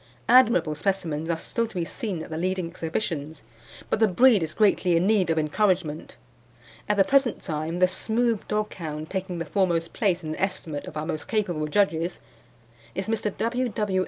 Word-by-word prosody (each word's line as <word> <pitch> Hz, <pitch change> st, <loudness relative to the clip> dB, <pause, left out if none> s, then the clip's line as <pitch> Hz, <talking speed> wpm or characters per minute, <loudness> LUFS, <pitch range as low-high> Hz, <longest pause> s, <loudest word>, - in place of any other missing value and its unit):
Admirable 235 Hz, -10 st, +5 dB
specimens 165 Hz, -2 st, -2 dB
are 165 Hz, -, +1 dB
still 230 Hz, +7 st, -2 dB
to 220 Hz, -, -15 dB
be 175 Hz, -2 st, -1 dB
seen 185 Hz, -4 st, -4 dB
at -, -, -11 dB
the -, -, -3 dB
leading 185 Hz, 0 st, -1 dB
exhibitions, 160 Hz, -, -4 dB, 0.5 s
but -, -, +2 dB
the 220 Hz, -, +5 dB
breed 220 Hz, +2 st, +5 dB
is 160 Hz, -1 st, -3 dB
greatly 190 Hz, -5 st, +3 dB
in 170 Hz, -, +2 dB
need 200 Hz, -4 st, +3 dB
of 165 Hz, -, +1 dB
encouragement. 160 Hz, -, 0 dB, 0.7 s
At 210 Hz, -, +2 dB
the 195 Hz, -, +6 dB
present 270 Hz, 0 st, +2 dB
time 160 Hz, 0 st, -3 dB
the 185 Hz, 0 st, +5 dB
smooth 225 Hz, +3 st, -1 dB
dog 210 Hz, 0 st, -1 dB
hound 155 Hz, -2 st, -6 dB
taking 190 Hz, -2 st, -3 dB
the 165 Hz, -, -3 dB
foremost 170 Hz, 0 st, 0 dB
place 185 Hz, -5 st, 0 dB
in 155 Hz, -, -4 dB
the -, -, -5 dB
estimate 165 Hz, -6 st, -3 dB
of 155 Hz, -, -7 dB
our 150 Hz, -, -2 dB
most 155 Hz, -2 st, -4 dB
capable 175 Hz, -9 st, -1 dB
judges 170 Hz, -1 st, +1 dB, 0.8 s
is 190 Hz, +3 st, -3 dB
Mr. 220 Hz, -1 st, -1 dB
W. 245 Hz, +2 st, 0 dB
W. 205 Hz, -3 st, -1 dB
185 Hz, 190 wpm, -25 LUFS, 160-210 Hz, 0.8 s, the